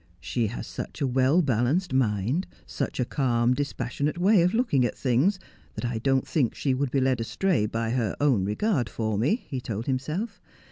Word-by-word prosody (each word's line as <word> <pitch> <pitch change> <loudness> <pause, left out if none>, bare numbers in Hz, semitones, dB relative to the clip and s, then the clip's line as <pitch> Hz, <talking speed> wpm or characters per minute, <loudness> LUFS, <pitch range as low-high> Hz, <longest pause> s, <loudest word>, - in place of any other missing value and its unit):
' 85 0 -32
She 120 -3 -1
has 110 - -5
such - - -7
a - - +2
well 130 +7 +3
balanced 135 - +1
mind, 125 - +1 0.2
such - - -4
a 125 - +2
calm, 120 -3 +1
dispassion 140 0 -2
ate 155 - -3
way 190 +2 +4
of 180 +5 +2
looking 225 - +2
at 120 - -1
things, 140 - +2 0.4
that - - -4
I 120 -2 -2
don't 135 +2 +1
think 135 -7 0
she 135 - 0
would 135 +1 0
be 135 - +1
led 130 -2 +1
astray 135 - 0
by 115 +1 -2
her 115 -5 0
own 135 -9 +3
regard 125 - 0
for 110 -2 -2
me,' 155 - +1
he 130 -4 -4
told 115 -1 -4
himself. 155 - -3
130 Hz, 200 wpm, -26 LUFS, 115-155 Hz, 0.4 s, way